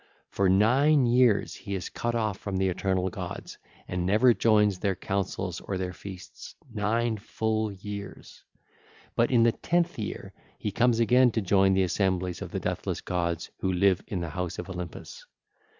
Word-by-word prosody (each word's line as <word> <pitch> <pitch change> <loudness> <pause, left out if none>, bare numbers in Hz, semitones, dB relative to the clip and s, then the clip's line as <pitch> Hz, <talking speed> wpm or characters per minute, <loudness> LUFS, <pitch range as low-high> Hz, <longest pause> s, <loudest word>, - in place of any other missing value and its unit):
For 100 -1 +2
nine 130 +9 +4
years 120 -3 +3
he 100 -3 -6
is 90 - -4
cut 120 0 -2
off 110 -4 -1
from 100 -2 -3
the 95 0 +2
eternal 95 0 -1
gods - - -7 0.3
and 90 -1 -2
never 110 +7 +5
joins 105 -4 +3
their 95 -1 0
councils 95 -2 -3
of 95 - -4
their 90 -1 -3
feasts, 95 -1 -10 0.2
nine 110 +2 0
full 110 0 -2
years. 100 0 -8 0.7
But 115 - +3
in 120 -3 +4
the 115 - +5
tenth 175 +3 0
year 105 - -5 0.2
he 105 - -3
comes 120 +3 +2
again 125 +2 +5
to 110 - 0
join 95 0 +3
the 95 - +3
assemblies 95 -1 0
of - - -5
the - - -3
deathless - - -3
gods 85 -2 -2
who 95 - 0
live 95 0 +3
in 95 -4 -3
the 85 - -3
house 90 +2 -4
of 90 +2 -6
Olympus. 90 -2 -7
100 Hz, 170 wpm, -27 LUFS, 95-115 Hz, 0.7 s, never